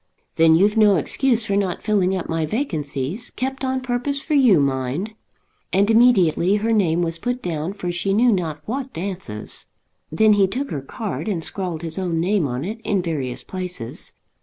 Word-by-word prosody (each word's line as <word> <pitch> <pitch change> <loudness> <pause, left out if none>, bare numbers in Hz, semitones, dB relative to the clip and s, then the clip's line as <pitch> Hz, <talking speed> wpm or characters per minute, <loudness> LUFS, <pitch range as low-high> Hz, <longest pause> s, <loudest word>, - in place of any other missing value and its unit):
"Then 160 0 +5
you've 205 +6 +3
no 210 -2 +6
excuse 235 - +2
for 200 - 0
not 195 -3 -1
filling 195 -3 +2
up 185 - -4
my 165 0 -1
vacancies, 160 - -2
kept 265 +1 -4
on 260 0 -1
purpose 255 +3 -1
for 305 - -3
you, 250 - +5
mind." 140 - -1 0.6
And 200 +3 +3
immediately 200 -6 +4
her 220 +2 0
name 175 -5 +2
was 165 -1 -3
put 245 +6 -3
down 165 +1 -3
for 180 -3 -4
she 175 +3 -1
knew 235 +5 +4
not 160 -6 -2
what 265 +3 -4
dances. 175 - -4 0.4
Then 215 +7 +4
he 200 -2 +4
took 265 +9 -4
her 140 - -3
card 210 - -5
and 180 -6 -2
scrawled 175 -4 -4
his 165 +2 -4
own 175 -3 -1
name 180 -2 +1
on 125 +4 -3
it 220 +4 -5
in 200 -5 0
various 140 -7 -3
places. 180 -11 -5
190 Hz, 185 wpm, -22 LUFS, 165-220 Hz, 0.6 s, no